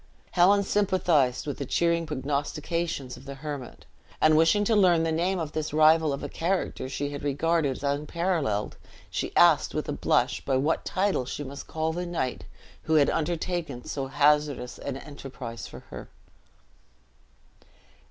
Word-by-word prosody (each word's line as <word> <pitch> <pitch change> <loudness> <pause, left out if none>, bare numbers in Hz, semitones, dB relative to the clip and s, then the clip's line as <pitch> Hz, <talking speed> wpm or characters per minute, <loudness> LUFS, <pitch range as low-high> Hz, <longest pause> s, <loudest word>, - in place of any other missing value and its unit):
Helen 195 +3 +5
sympathized 180 -11 +2
with 145 - -4
the 140 - -3
cheering 170 +1 +1
prognostications 150 0 -3
of 130 - -14
the 140 0 -7
hermit; 140 -3 -7 0.3
and 155 0 +5
wishing 165 +6 +4
to 220 +2 +2
learn 180 -5 +4
the 165 - 0
name 175 +4 0
of 160 -3 -3
this 155 -1 -3
rival 155 0 +5
of 140 - -4
a - - -2
character 170 -5 -2
she 145 +1 -3
had 145 - -6
regarded 150 +2 +1
as - - -12
unparalleled, 145 - -1 0.3
she - - -2
asked, - - +5
with - - -2
a - - -2
blush, - - +1
by 135 -2 +1
what 150 +5 0
title 190 -8 0
she 145 - -5
must 140 0 -8
call 160 0 -2
the 175 +1 -3
knight 165 -8 -3 0.4
who 160 - 0
had 145 -2 +5
undertaken 165 -4 -2
so 135 -2 -3
hazardous 145 -2 +1
an 135 -1 -4
enterprise 130 -6 -8
for - - -11
her. - - -8
155 Hz, 160 wpm, -27 LUFS, 140-170 Hz, 0.4 s, Helen